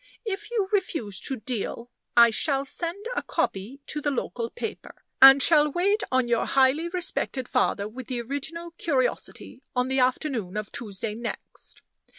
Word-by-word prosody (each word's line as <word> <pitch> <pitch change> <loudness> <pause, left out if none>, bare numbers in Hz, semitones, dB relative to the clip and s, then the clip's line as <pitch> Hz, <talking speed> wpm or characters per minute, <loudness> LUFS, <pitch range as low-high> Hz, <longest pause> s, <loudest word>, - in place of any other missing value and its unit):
If 420 0 -4
you 440 -5 0
refuse 285 - -1
to 265 - -2
deal, 235 +1 -4 0.3
I 235 -1 +8
shall 275 +4 +1
send 345 +8 -2
a - - 0
copy 220 +9 -2
to 300 - -3
the 290 - 0
local 240 -3 -3
paper, - - -6 0.3
and 270 +1 +10
shall 300 -2 +5
wait 400 +7 +2
on 255 -1 +2
your 235 -1 +1
highly 275 +5 +3
respected 340 -7 -2
father 200 0 +1
with 245 +3 -9
the 250 -2 -2
original 305 +7 -5
curiosity, 260 -3 -1
on 250 +1 +1
the 265 0 +1
afternoon 250 - 0
of 210 -1 -4
Tuesday 210 -1 -4
next. 235 +2 -5
265 Hz, 160 wpm, -26 LUFS, 235-325 Hz, 0.3 s, and